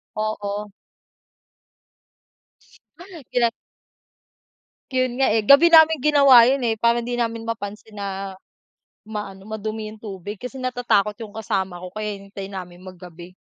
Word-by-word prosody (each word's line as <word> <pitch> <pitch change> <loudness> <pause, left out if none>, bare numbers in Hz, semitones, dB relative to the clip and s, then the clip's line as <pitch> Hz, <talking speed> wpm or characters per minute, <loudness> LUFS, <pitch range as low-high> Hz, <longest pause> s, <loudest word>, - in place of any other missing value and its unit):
Oo. 210 -1 -3 2.6
Kilan 235 -2 +2 1.4
Yun 255 -1 -1
nga, 270 - +4
eh, 220 - +2
gabi 280 +9 +7
naming 320 -2 +6
ginawa 275 -4 +6
yun 270 0 +1
eh, 225 -2 0
parang 235 +1 +2
hindi 245 +1 -3
namin 230 -1 -2
mapansin 220 -1 -6
na 195 -2 -6 0.6
ma-ano, 210 -2 -8
madumi 215 0 -5
yung 215 - -12
tubig. 205 -1 -8
Kasi 250 +4 -8
natatakot 240 -5 0
yung 205 - -15
kasama 190 -5 -3
ko, 185 - -7
kaya 210 0 -5
hinihintay 195 0 -8
namin 180 -2 -8
maggabi. 180 -1 -12
215 Hz, 125 wpm, -22 LUFS, 200-240 Hz, 2.6 s, gabi